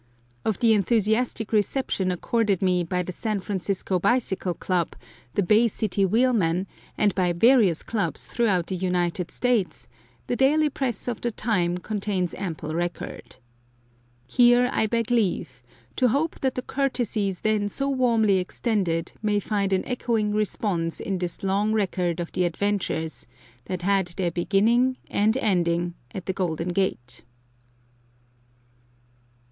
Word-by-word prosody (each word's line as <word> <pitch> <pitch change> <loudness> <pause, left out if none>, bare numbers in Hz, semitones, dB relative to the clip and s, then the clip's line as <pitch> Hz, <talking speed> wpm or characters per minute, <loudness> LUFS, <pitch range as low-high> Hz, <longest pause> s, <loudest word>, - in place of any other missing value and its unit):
Of 215 -4 0
the 230 -2 +5
enthusiastic 220 +2 +1
reception 210 -3 0
accorded 200 +2 0
me 180 -1 +2
by 180 +2 -1
the 185 - -5
San 215 +3 -2
Francisco 190 -1 -2
Bicycle 195 -4 0
Club, 180 -1 -1 0.4
the 200 - +2
Bay 215 +5 +4
City 205 -2 0
Wheelmen, 195 -6 +2 0.3
and 205 -2 +3
by 180 -2 +1
various 210 -3 +4
clubs 220 -3 -2
throughout 200 -8 +1
the 190 - -3
United 180 -1 -1
States, 245 -7 0 0.4
the - - -1
daily 295 +4 +3
press 260 -4 -3
of 235 -3 -3
the 240 - 0
time 185 -6 0
contains 195 -2 -2
ample 160 -5 -5
record. 175 -4 -4 0.9
Here, 245 - +4
I 220 - +2
beg 230 +1 -1
leave 200 - 0 0.4
to 255 - +4
hope 285 +7 0
that 265 -1 0
the 255 - -3
courtesies 235 -9 -1
then 215 -1 +1
so 275 +7 -2
warmly 230 -7 +3
extended 180 -4 -1
may 210 -1 +1
find 200 -1 -1
an 190 -1 +1
echoing 230 -4 -1
response 200 -5 -1
in 195 -2 -2
this 175 +1 -5
long 200 +3 +1
record 180 -5 0
of 170 - -4
the 180 - +1
adventures 175 - -2 0.4
that 180 -1 -4
had 195 -1 +2
their 175 0 -2
beginning 225 +9 +2
and 215 +4 +2
ending 175 -7 +1 0.2
at 185 - -7
the 190 - -1
Golden 175 -2 -2
Gate. 175 -10 -2
200 Hz, 140 wpm, -25 LUFS, 180-230 Hz, 0.9 s, the